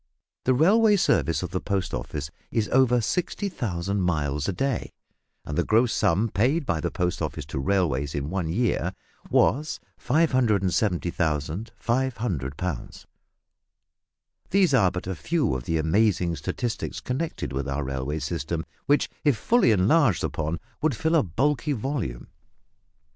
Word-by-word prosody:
The 130 - +3
railway 205 - +5
service 85 - +2
of 90 - -4
the 95 - -2
Post 100 -2 -2
Office 75 +1 -4 0.2
is 110 -2 0
over 125 -2 +4
60,000 105 - -2
miles 75 -5 0
a - - +2
day, 130 +6 -2 0.5
and 75 - -4
the 85 - +2
gross 115 +4 +3
sum 100 +7 +2
paid 125 - +1
by 80 -7 -1
the 85 - -1
Post 90 -1 -2
Office - - -3
to 70 -2 -4
railways 70 -4 0
in 70 +2 -3
one 95 -3 -1
year 115 +6 0 0.3
was 150 +5 +2 0.2
570,500 105 - 0
pounds. 90 -8 -5 1.4
These 185 -6 +3
are 110 -8 +5
but 90 0 -5
a 95 - -2
few 145 - 0
of 65 -1 -4
the 80 - 0
amazing 85 +1 +2
statistics 120 +7 -3
connected 130 - -3
with 70 0 -2
our 70 +1 -1
railway 65 +3 -3
system, 80 +1 -3 0.2
which, 145 +2 +3 0.2
if 145 -6 +3
fully 240 - +3
enlarged 110 - +3
upon, 80 +2 -2 0.2
would 155 -4 +1
fill 160 +7 0
a 165 - +5
bulky 140 - 0
volume. 115 - -3
95 Hz, 140 wpm, -25 LUFS, 80-130 Hz, 1.4 s, railway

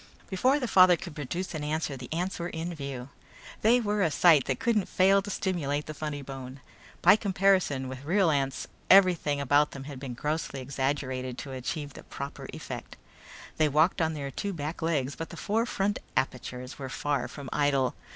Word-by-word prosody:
Before 255 +10 +3
the 250 - -2
father 185 -3 +7
could 175 -2 -8
produce 170 +6 -4
an 155 -2 -4
answer 150 -1 -2
the 125 -2 -9
ants 175 +4 -2
were 170 +1 -3
in 165 +2 -4
view. 140 -4 -6 0.5
They 235 +3 +5
were 210 -2 0
a 170 - +3
sight 155 -3 +5
that - - -1
couldn't 235 -6 +1
fail 195 +2 +4
to 200 - -8
stimulate 150 -7 -1
the 155 - -6
funny 150 -1 -4
bone. 135 0 -8 0.4
By - - +8
comparison 190 -9 +2
with 130 +1 -7
real 175 +2 +3
ants 135 -2 -1 0.2
everything 180 -7 +5
about 145 +2 +3
them 140 - -7
had 140 -2 -8
been 130 -3 -6
grossly 150 +1 -2
exaggerated 130 -1 -2
to 135 +2 -7
achieve 140 +3 -4
the - - -10
proper 140 +1 -7
effect. - - -8 0.6
They 155 -1 +3
walked 155 +5 +3
on 160 -1 +1
their 140 -2 -4
two 200 +7 -3
back 155 0 -5
legs 145 -5 0
but 165 - -6
the - - -9
four 225 +3 0
front 205 -2 0 0.2
apertures 130 0 -3
were 135 -1 -5
far 140 -2 -1
from 140 +2 -9
idle. 140 -3 +2
150 Hz, 190 wpm, -28 LUFS, 135-185 Hz, 0.6 s, By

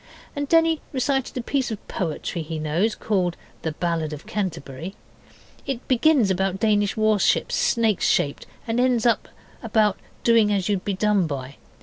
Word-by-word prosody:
And 285 0 -3
Denny 330 -1 +4
recited 270 0 -1
a 245 - -2
piece 270 +1 0
of 220 -3 -7
poetry 170 0 -3
he 160 0 -5
knows 160 +8 0
called 185 -5 -1 0.2
'The 160 - -3
Ballad 165 -2 -2
of 150 - -9
Canterbury'. 180 -3 -4 0.7
It 265 -3 -4
begins 255 -4 +4
about 190 +1 0
Danish 205 -2 +2
warships 215 -2 +2
snake 225 -5 +2
shaped, 140 - +1 0.2
and 230 0 -1
ends 250 -2 +2 0.6
about 215 -3 +2 0.2
doing 230 -3 +4
as 195 -3 0
you'd 200 -3 0
be 200 - -1
done 205 -3 +2
by. 140 -2 -6
205 Hz, 150 wpm, -24 LUFS, 175-235 Hz, 0.7 s, Denny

